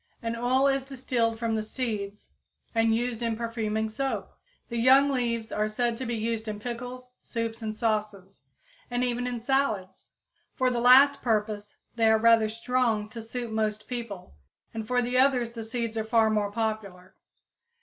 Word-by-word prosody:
An 230 0 -2
oil 250 +3 +2
is 275 -1 +2
distilled 245 -4 -1
from 230 0 -1
the 220 - 0
seeds 215 -3 -5 0.4
and 225 -1 +3
used 240 0 -2
in 230 -1 0
perfuming 220 -2 -2
soap. 270 +5 -3 0.4
The 235 -1 -3
young 265 +4 +6
leaves 235 -4 -1
are 210 0 0
said 235 +2 -1
to 255 0 -4
be 235 - -1
used 225 0 -2
in 210 -1 -4
pickles, 250 +2 -7
soups 230 -1 -4
and 215 -1 -4
sauces, 210 -4 -2 0.5
and 245 0 0
even 245 0 -1
in 245 -1 -3
salads. 225 -7 -1 0.5
For 255 -2 +2
the 240 -1 -1
last 270 +3 +7
purpose 210 -2 -1 0.2
they 225 -1 +4
are 220 - +5
rather 225 -1 +5
strong 230 -2 0
to 230 +1 -7
suit 235 +1 -5
most 215 -1 -1
people, 230 - -6 0.4
and 220 -1 -5
for 245 0 +2
the 250 +1 +1
others 255 -3 +3
the 230 -1 -6
seeds 230 0 -3
are 220 - -1
far 220 0 +3
more 210 -1 0
popular. 205 -4 -4
230 Hz, 170 wpm, -27 LUFS, 215-245 Hz, 0.5 s, last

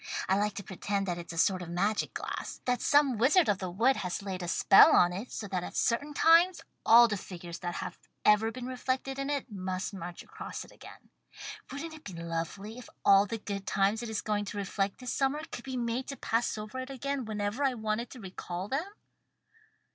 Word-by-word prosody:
I 190 - +3
like 205 0 0
to 200 - -5
pretend 195 +2 -2
that 175 -2 -2
it's 170 - -8
a 165 - -8
sort 185 +2 +3
of 175 - -7
magic 200 +5 0
glass - - -5
that 250 -1 +1
some 285 -6 +4
wizard 300 +9 +5
of 200 -2 +2
the 185 - -3
wood 230 +9 +2
has 180 +1 -3
laid 190 -2 -4
a 175 - -4
spell 195 - +7
on 175 0 +5
it, 205 +7 -6
so 205 - -5
that 180 -2 -2
at - - -7
certain 285 +5 0
times 335 +3 +5 0.2
all 235 +1 +8
the 210 -2 -2
figures 175 -2 -8
that 175 -1 -4
have - - -5 0.3
ever 210 +1 +5
been 250 +1 -7
reflected 260 +1 -2
in 275 +1 -2
it 280 -4 -2
must 185 -1 -3
march 175 -2 -7
across - - -7
it - - -17
again. - - -14 0.6
Wouldn't 315 +4 -5
it 315 -1 -12
be 195 - -8
lovely 170 +7 -5
if 250 - -12 0.2
all 200 +1 +6
the 230 - -3
good 200 -2 -5
times 200 +3 +2
it 235 - -5
is 220 -1 -2
going 210 -1 -1
to 205 - -6
reflect 195 0 -1
this 250 -1 -4
summer 280 +3 0
could 240 - -7
be 260 -1 -4
made 240 +1 -2
to 275 - -6
pass 230 0 0
over 215 +4 -6
it 260 +1 -5
again 275 0 -3
whenever 210 +4 -2
I 265 -2 +2
wanted 220 +1 -2
to 255 - -10
recall 185 -2 -6
them?" 310 +8 -1
215 Hz, 220 wpm, -30 LUFS, 190-255 Hz, 0.6 s, all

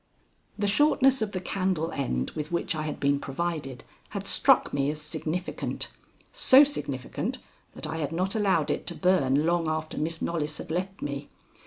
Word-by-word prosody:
The 205 - 0
shortness 270 +3 +4
of 215 -2 -1
the 185 - -3
candle 185 -3 -1
end 65 - -2
with 150 +1 -5
which 170 0 0
I 155 - -3
had 150 - -4
been 140 0 +2
provided 140 -3 -4 0.3
had - - -5
struck - - +4
me 140 0 +1
as 150 0 -3
significant, 155 +4 -3 0.4
so 290 - +7
significant 140 - -3 0.4
that - - -7
I 160 +1 -4
had 150 -3 -2
not 185 +4 -1
allowed 185 -9 +2
it - - -3
to - - -4
burn 150 -6 +3
long 170 -1 +1
after 155 0 -2
Miss 160 +2 -1
Knollys 155 -3 -2
had - - -7
left 190 +3 -3
me. 140 0 -4
165 Hz, 175 wpm, -27 LUFS, 150-190 Hz, 0.4 s, so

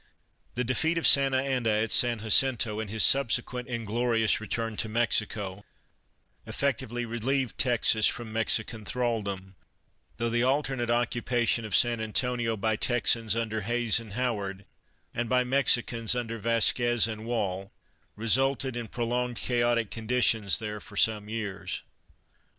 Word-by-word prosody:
The 125 - -1
defeat 160 +7 0
of 165 - -1
Santa 135 -1 +5
Anna 130 -4 -1
at 110 0 0
San 120 +3 +3
Jacinto 110 -1 +2
and 110 -2 -5
his 110 +1 +3
subsequent 125 -1 +2
inglorious 115 -1 0
return 115 +1 -3
to 110 - -2
Mexico, 105 -4 -1 0.8
effectually 120 -3 -2
relieved 120 +2 -2
Texas 115 -3 +3
from 115 -2 -4
Mexican 110 0 0
thraldom, 100 -5 -3 0.6
though 115 - -1
the 120 0 +1
alternate 130 -2 0
occupation 120 -1 0
of 105 -4 -2
San 120 -1 +2
Antonio 115 +1 -1
by 110 +2 0
Texans 115 -2 +1
under 110 -1 -2
Hays 120 +2 +1
and 110 -3 -11
Howard, 100 -5 -3 0.5
and 120 -1 -3
by 125 0 +3
Mexicans 125 -3 +2
under 115 -2 -4
Vasquez 115 +1 +2
and 110 -1 -6
Woll, 95 -5 -3 0.4
resulted 130 +3 +1
in 120 -2 -5
prolonging 120 +1 -2
chaotic 120 -2 0
conditions 115 -3 +2
there 105 -1 -5
for - - -12
some 105 -1 +1
years. 105 -4 -5
115 Hz, 135 wpm, -27 LUFS, 110-125 Hz, 0.8 s, Santa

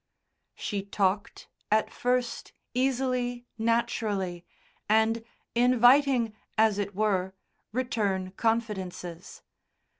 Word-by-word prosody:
She 205 -2 -3
talked, 200 0 -1 0.2
at 215 +1 +2
first 250 0 -1 0.2
easily, 250 -1 0
naturally, 215 -6 0 0.5
and 220 +1 +3 0.3
inviting, 245 0 +5 0.2
as 215 -2 +4
it 200 -1 -3
were, 190 -3 0 0.4
return 205 -6 -1
confidences. 190 -6 -3
220 Hz, 80 wpm, -28 LUFS, 195-245 Hz, 0.5 s, inviting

